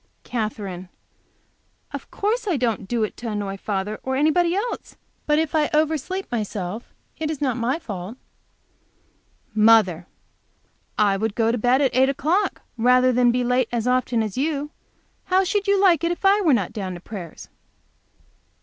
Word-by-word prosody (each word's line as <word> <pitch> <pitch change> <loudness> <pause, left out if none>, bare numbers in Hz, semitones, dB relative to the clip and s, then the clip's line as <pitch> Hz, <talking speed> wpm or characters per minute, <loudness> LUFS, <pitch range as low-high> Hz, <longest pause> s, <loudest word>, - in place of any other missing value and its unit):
Katherine. 205 -6 -4 1.0
"Of - - -7
course 435 +3 -1
I 350 -6 +1
don't 230 -6 -1
do 235 0 0
it 215 - -3
to 240 - -5
annoy 205 -2 -3
father 200 +1 -3
or 260 0 -2
anybody 335 +5 +2
else. 445 +5 -4 0.3
But 300 0 +3
if 320 -1 0
I 305 -2 +2
oversleep 315 +5 0
myself, 210 -2 -4 0.3
it 315 -1 -2
is 310 -3 -3
not 260 -5 0
my 245 +4 0
fault." 205 - -7 1.4
Mother. 210 -6 +4 0.9
"I 200 -2 +3
would 220 +1 -2
go 225 -1 +2
to 240 - -1
bed 250 +4 +3
at 265 - +1
eight 260 +1 +4
o'clock 315 +9 0
rather 250 +2 +4
than 245 0 +4
be 250 +1 0
late 250 -1 +1
as 240 0 -1
often 250 -2 +1
as 215 +2 -4
you. 295 0 -1 0.5
How 375 +1 +3
should 400 +2 -1
you 400 0 +3
like 355 -5 +4
it 335 - +1
if 350 - -4
I 400 +2 +5
were 335 -6 +3
not 210 -9 +1
down 190 -4 -4
to - - -8
prayers?" 180 -3 -9
250 Hz, 170 wpm, -23 LUFS, 215-310 Hz, 1.4 s, I